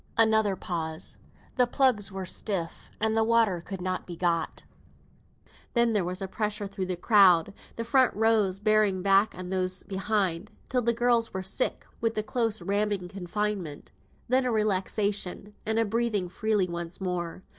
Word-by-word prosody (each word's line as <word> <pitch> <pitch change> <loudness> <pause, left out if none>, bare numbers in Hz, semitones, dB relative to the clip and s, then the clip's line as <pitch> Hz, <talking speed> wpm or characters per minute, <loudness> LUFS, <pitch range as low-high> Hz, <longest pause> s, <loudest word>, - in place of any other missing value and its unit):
Another 220 -3 +3
pause; 160 -2 -5 0.4
the 250 -1 +4
plugs 240 -8 +2
were 190 -1 -5
stiff, 185 -2 -3
and 220 0 +1
water 225 -5 +2
could 190 +1 -7
not 185 0 -3
be 175 - -6
got. 170 -1 -1 1.1
Then 235 -1 +3
there 205 -3 +2
was 180 +3 -3
a - - -3
pressure 210 +1 -2
through 195 -1 -4
the 185 - -1
crowd, 185 -2 +5 0.2
the 230 - -3
front 255 +2 +3
rows 215 -3 +2
bearing 210 -3 +2
back 195 +2 +3
on 180 0 -6
those 185 0 -1
behind, 195 -1 -1 0.2
till 250 0 +1
the 235 0 +2
girls 235 -2 +2
were 190 - -2
sick 190 +7 -1
with 230 -1 -1
the 215 - 0
close 220 -3 0
ramming 200 -1 -1
confinement. 190 -3 -4 0.4
Then 260 +2 +3
a 250 - 0
relaxation, 205 -1 0
and 220 0 +1
a 225 - +3
breathing 215 -4 0
freely 210 0 0
once 170 0 -6
more. 180 -1 -4
200 Hz, 160 wpm, -27 LUFS, 185-220 Hz, 1.1 s, crowd